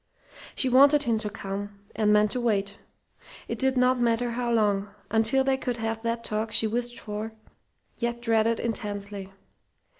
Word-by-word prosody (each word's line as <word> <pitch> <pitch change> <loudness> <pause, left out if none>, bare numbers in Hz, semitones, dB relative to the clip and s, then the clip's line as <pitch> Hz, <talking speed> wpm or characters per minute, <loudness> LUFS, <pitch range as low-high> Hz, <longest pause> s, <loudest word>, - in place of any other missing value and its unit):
She 265 - +2
wanted 280 +3 +6
him 230 -4 +1
to 210 - -2
come, 200 0 -6 0.2
and 210 -1 +2
meant 210 0 +4
to 250 - -1
wait 200 -4 0 0.7
(it - - -4
did 265 0 +1
not 250 0 +3
matter 240 0 +1
how 240 0 -2
long) 205 -3 +1 0.2
until 225 +4 +3
they 265 0 +1
could 245 -2 -3
have 225 0 -3
that 230 0 -2
talk 215 0 -2
she 220 - +4
wished 240 +2 -2
for 215 +1 -5 0.7
yet 235 0 -2
dreaded 230 -1 +2
intensely. 205 -4 -4
225 Hz, 160 wpm, -26 LUFS, 210-240 Hz, 0.7 s, wanted